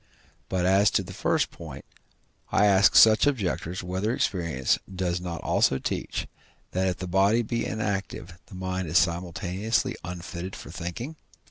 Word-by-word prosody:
But, 90 Hz, -1 st, 0 dB
as 95 Hz, +2 st, +5 dB
to -, -, -1 dB
the -, -, -9 dB
first -, -, 0 dB
point, -, -, -10 dB, 0.7 s
I 105 Hz, -, +4 dB
ask 100 Hz, -1 st, +5 dB
such 110 Hz, +4 st, +7 dB
objectors, 95 Hz, -, -1 dB
whether 95 Hz, +6 st, -1 dB
experience 85 Hz, -, 0 dB
does 90 Hz, -1 st, -2 dB
not 85 Hz, -2 st, -5 dB
also 65 Hz, -, +2 dB
teach, -, -, -3 dB, 0.5 s
that 95 Hz, +1 st, 0 dB
if 90 Hz, -, -1 dB
the 95 Hz, -, -5 dB
body 100 Hz, +6 st, +3 dB
be 115 Hz, +1 st, -2 dB
inactive 100 Hz, -4 st, -3 dB
the -, -, -12 dB
mind 95 Hz, -1 st, -3 dB
is 80 Hz, +3 st, +2 dB
simultaneously 90 Hz, +7 st, 0 dB
unfitted 90 Hz, +1 st, -6 dB
for -, -, -10 dB
thinking? 115 Hz, -, -6 dB
95 Hz, 150 wpm, -26 LUFS, 90-105 Hz, 0.7 s, such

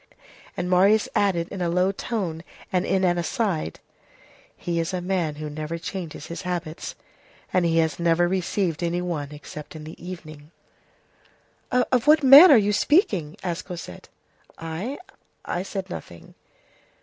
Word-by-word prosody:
And 180 Hz, -1 st, -2 dB
Marius 195 Hz, +4 st, +4 dB
added 175 Hz, -4 st, +1 dB
in 195 Hz, -, -6 dB
a 175 Hz, -, 0 dB
low 180 Hz, +3 st, +2 dB
tone 190 Hz, -6 st, -3 dB, 0.3 s
and 180 Hz, 0 st, +1 dB
in 190 Hz, 0 st, +1 dB
an 175 Hz, -1 st, +2 dB
aside:— 170 Hz, -, -2 dB, 0.8 s
"He 170 Hz, -1 st, -2 dB
is 165 Hz, +3 st, -2 dB
a -, -, -1 dB
man 175 Hz, -4 st, -1 dB
who 155 Hz, +1 st, -6 dB
never 155 Hz, +2 st, -5 dB
changes 165 Hz, -3 st, -6 dB
his 170 Hz, -, -6 dB
habits, 175 Hz, -3 st, -5 dB, 0.6 s
and 180 Hz, -2 st, +3 dB
he 165 Hz, -1 st, +2 dB
has 160 Hz, -1 st, +1 dB
never 170 Hz, 0 st, +3 dB
received 185 Hz, -2 st, -1 dB
any 170 Hz, 0 st, 0 dB
one 150 Hz, -5 st, -3 dB
except 150 Hz, +1 st, -10 dB
in 155 Hz, -, -8 dB
the 160 Hz, +2 st, -11 dB
evening." 155 Hz, -5 st, -9 dB, 1.2 s
"Of 250 Hz, 0 st, +1 dB
what 305 Hz, 0 st, +6 dB
man 280 Hz, +7 st, +10 dB
are 280 Hz, -, +8 dB
you 210 Hz, -1 st, +2 dB
speaking?" 200 Hz, -, +2 dB
asked 175 Hz, -2 st, -3 dB
Cosette. 170 Hz, -, -9 dB, 0.5 s
"I? 165 Hz, -, -5 dB, 0.5 s
I 175 Hz, -, -2 dB
said 195 Hz, 0 st, -5 dB
nothing." 85 Hz, -, -10 dB
175 Hz, 150 wpm, -24 LUFS, 160-195 Hz, 1.2 s, man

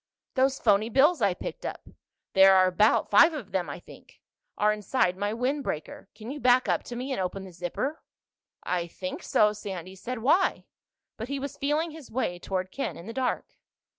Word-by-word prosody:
"Those 265 Hz, 0 st, +2 dB
phony 215 Hz, 0 st, +3 dB
bills 285 Hz, +6 st, +4 dB
I 200 Hz, -4 st, +2 dB
picked -, -, -7 dB
up—there 190 Hz, 0 st, +1 dB
are 185 Hz, 0 st, +6 dB
about 185 Hz, +5 st, +3 dB
five 335 Hz, 0 st, +7 dB
of 260 Hz, -10 st, -7 dB
them, 180 Hz, -5 st, -1 dB
I 145 Hz, -, -6 dB
think—are 210 Hz, +4 st, -4 dB
inside 210 Hz, -2 st, 0 dB
my 205 Hz, +2 st, -2 dB
windbreaker. 250 Hz, -, -3 dB
Can 220 Hz, +3 st, -8 dB
you 295 Hz, -, -6 dB
back 250 Hz, -1 st, +4 dB
up -, -, +1 dB
to 240 Hz, -, -7 dB
me 255 Hz, +3 st, -4 dB
and 255 Hz, -, -1 dB
open 185 Hz, +1 st, -3 dB
the 190 Hz, -, -10 dB
zipper?" 180 Hz, -, -4 dB, 0.6 s
"I 175 Hz, -1 st, -1 dB
think 185 Hz, +2 st, -6 dB
so," 210 Hz, 0 st, +3 dB
Sandy 190 Hz, -3 st, -7 dB
said. 250 Hz, +6 st, -5 dB
"Why?" 350 Hz, +9 st, +2 dB, 0.5 s
But 225 Hz, -, -5 dB
he 280 Hz, +1 st, -3 dB
was 275 Hz, +1 st, -5 dB
feeling 300 Hz, +4 st, 0 dB
his 310 Hz, -3 st, -11 dB
way 220 Hz, -7 st, -2 dB
toward 185 Hz, 0 st, -3 dB
Ken 275 Hz, -, -4 dB
in 170 Hz, -, -10 dB
the 230 Hz, -, -7 dB
dark. 255 Hz, -1 st, -3 dB
215 Hz, 185 wpm, -27 LUFS, 185-265 Hz, 0.6 s, five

